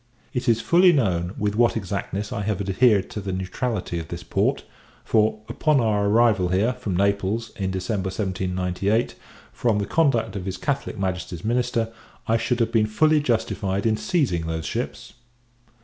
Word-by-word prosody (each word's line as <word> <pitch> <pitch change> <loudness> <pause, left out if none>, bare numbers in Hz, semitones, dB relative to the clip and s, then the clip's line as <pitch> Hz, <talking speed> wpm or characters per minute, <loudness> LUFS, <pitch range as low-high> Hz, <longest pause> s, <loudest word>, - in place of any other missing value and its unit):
It 125 0 -1
is 115 -1 +3
fully 180 +6 +5
known, 95 - 0
with 105 0 -1
what 120 0 +3
exactness 100 +2 -4
I 100 - -2
have 105 -1 -1
adhered 100 +1 +3
to 105 - -4
the 95 0 -4
neutrality 95 0 -3
of 80 - -7
this - - -7
port; - - 0 0.4
for, 110 -1 +2
upon 155 -3 +2
our 105 -3 +1
arrival 110 -3 +3
here, 100 +7 +1
from 115 -8 -3
Naples, 100 +3 0
in 95 -2 -2
December 95 +1 -2
1798, 95 +2 -1 0.4
from 115 -4 +1
the 100 - -1
conduct 115 -10 +1
of 95 -2 -4
his 95 -1 -4
Catholic 140 -5 -2
Majesty's 90 -2 -3
minister, 120 -1 0 0.3
I 115 - +3
should 125 +1 -1
have 115 0 +1
been 110 -2 +3
fully 155 +8 +3
justified 105 -7 -1
in 110 -1 +3
seizing 135 - 0
those 80 -1 -3
ships. - - -4
105 Hz, 165 wpm, -24 LUFS, 95-120 Hz, 0.4 s, fully